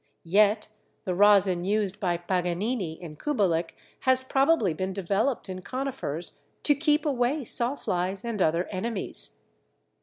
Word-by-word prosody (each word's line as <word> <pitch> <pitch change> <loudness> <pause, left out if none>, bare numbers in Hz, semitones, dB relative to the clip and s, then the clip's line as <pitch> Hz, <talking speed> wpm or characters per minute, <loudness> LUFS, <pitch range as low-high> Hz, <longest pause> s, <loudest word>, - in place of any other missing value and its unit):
Yet 210 +4 +3 0.4
the 185 - -1
rosin 195 -2 +5
used 200 0 0
by 175 -3 0
Paganini 180 +1 -2
and 155 -3 -9
Kubelik 185 - 0 0.2
has 260 0 +4
probably 270 - +2
been 185 +4 -3
developed 200 +7 -1
in 185 -1 -6
Conifers 255 - -4 0.2
to 295 - +4
keep 295 +1 +1
away 270 +1 0
sawflies 200 -6 -2
and 225 -4 -3
other 165 +1 +2
enemies. 205 +2 -1
200 Hz, 125 wpm, -27 LUFS, 180-255 Hz, 0.4 s, rosin